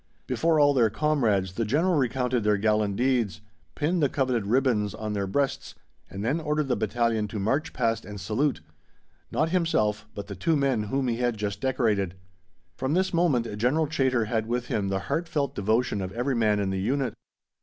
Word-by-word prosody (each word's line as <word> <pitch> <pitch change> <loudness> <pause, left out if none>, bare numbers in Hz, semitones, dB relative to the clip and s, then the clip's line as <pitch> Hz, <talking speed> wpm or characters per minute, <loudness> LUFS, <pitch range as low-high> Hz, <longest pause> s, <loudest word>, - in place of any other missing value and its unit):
Before 160 -1 +1
all 145 -1 +5
their 120 -5 +4
comrades 110 - +1
the 115 - -1
General 155 - +2
recounted 125 -4 +1
their 105 -1 +3
gallant 105 -1 +1
deeds, 120 -4 0 0.3
pinned 165 - 0
the 145 - +3
coveted 130 -7 0
ribbons 115 -4 +1
on 110 -1 -4
their 100 -1 -1
breasts, 140 +7 -1 0.3
and 100 +3 -5
then 140 +8 +1
ordered 150 -2 -1
the 125 - +2
battalion 115 0 0
to 105 - -6
march 135 +10 0
past 115 -2 0
and 105 +1 -8
salute 110 - 0 0.7
not 160 - 0
himself, 110 - +1
but 100 - -5
the 100 - -7
two 160 - +1
men 135 -7 +1
whom 135 +5 -1
he 115 -1 0
had 120 -2 0
just 105 -1 -3
decorated. 110 -8 0 0.6
From 130 +4 -1
this 190 0 +1
moment 130 -11 +1
General 140 +8 +2
Chaytor 130 -6 +1
had 110 0 -1
with 120 +1 -2
him 100 -2 0
the 95 0 -1
heartfelt 145 - -1
devotion 110 -1 0
of 95 0 -4
every 125 +4 -1
man 110 -3 +2
in 100 -1 -1
the 95 0 -2
unit. 130 +1 0
120 Hz, 185 wpm, -26 LUFS, 105-140 Hz, 0.7 s, all